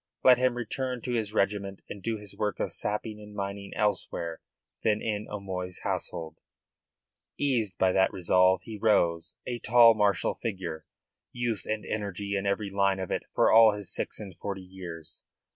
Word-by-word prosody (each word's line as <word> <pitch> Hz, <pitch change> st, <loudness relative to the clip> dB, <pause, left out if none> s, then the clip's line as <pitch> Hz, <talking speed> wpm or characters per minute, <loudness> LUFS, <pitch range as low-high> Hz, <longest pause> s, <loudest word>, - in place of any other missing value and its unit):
Let 125 Hz, -1 st, +7 dB
him 125 Hz, -1 st, +2 dB
return 125 Hz, +1 st, -3 dB
to 125 Hz, -, -3 dB
his 110 Hz, -3 st, 0 dB
regiment 100 Hz, -2 st, -1 dB
and 100 Hz, -, -8 dB
do 115 Hz, +2 st, -2 dB
his 105 Hz, -2 st, -6 dB
work 105 Hz, -1 st, -2 dB
of -, -, -2 dB
sapping 105 Hz, +1 st, -2 dB
and 105 Hz, 0 st, -12 dB
mining 100 Hz, 0 st, -4 dB
elsewhere 85 Hz, -5 st, -1 dB, 0.4 s
than 105 Hz, -1 st, +3 dB
in 105 Hz, -1 st, -2 dB
O'Moy's 95 Hz, -3 st, -5 dB
household. 80 Hz, -1 st, -3 dB, 1.0 s
Eased 115 Hz, -10 st, 0 dB
by 95 Hz, -, +3 dB
that 95 Hz, 0 st, +3 dB
resolve 90 Hz, 0 st, +3 dB
he 110 Hz, 0 st, -8 dB
rose, 85 Hz, -6 st, +2 dB
a 120 Hz, -1 st, -3 dB
tall, 115 Hz, +1 st, +7 dB
martial 105 Hz, -3 st, +2 dB
figure, 95 Hz, -8 st, -5 dB, 0.4 s
youth 120 Hz, -4 st, -2 dB
and 110 Hz, 0 st, -2 dB
energy 100 Hz, -1 st, -3 dB
in 100 Hz, 0 st, -1 dB
every 100 Hz, 0 st, -1 dB
line 100 Hz, -1 st, +2 dB
of 95 Hz, -, -4 dB
it -, -, 0 dB
for -, -, +4 dB
all 110 Hz, -1 st, +8 dB
his 105 Hz, -2 st, -1 dB
six -, -, -2 dB
and 100 Hz, -4 st, -8 dB
forty 100 Hz, -2 st, -4 dB
years. 90 Hz, -4 st, -7 dB
100 Hz, 170 wpm, -28 LUFS, 95-110 Hz, 1.0 s, all